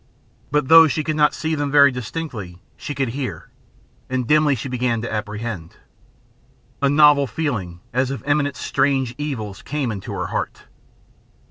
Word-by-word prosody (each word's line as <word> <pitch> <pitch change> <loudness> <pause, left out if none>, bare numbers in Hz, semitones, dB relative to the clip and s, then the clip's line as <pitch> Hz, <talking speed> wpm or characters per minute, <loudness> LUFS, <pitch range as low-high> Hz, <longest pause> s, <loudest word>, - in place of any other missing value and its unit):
But 150 -2 +1
though 165 +1 +9
she 155 +1 -1
could 155 +1 -2
not 150 -1 +3
see 160 0 -2
them 145 -2 -1
very 140 0 +6
distinctly 120 - -6 0.2
she 145 - -6
could 135 -3 -1
hear, 130 +2 -5 0.6
and 130 -1 -1
dimly 150 +1 +3
she 125 - -5
began 125 -2 -1
to 120 - -4
apprehend. 105 -4 -5 1.1
A 140 - +3
novel 145 -1 +5
feeling 110 - -3
as 130 +1 +1
of 135 - -5
imminent 145 -1 +1
strange 135 -3 0
evils 110 -10 -4
came 140 -4 -2
into 100 -3 -6
her - - -3
heart. - - -3
135 Hz, 155 wpm, -21 LUFS, 115-150 Hz, 1.1 s, though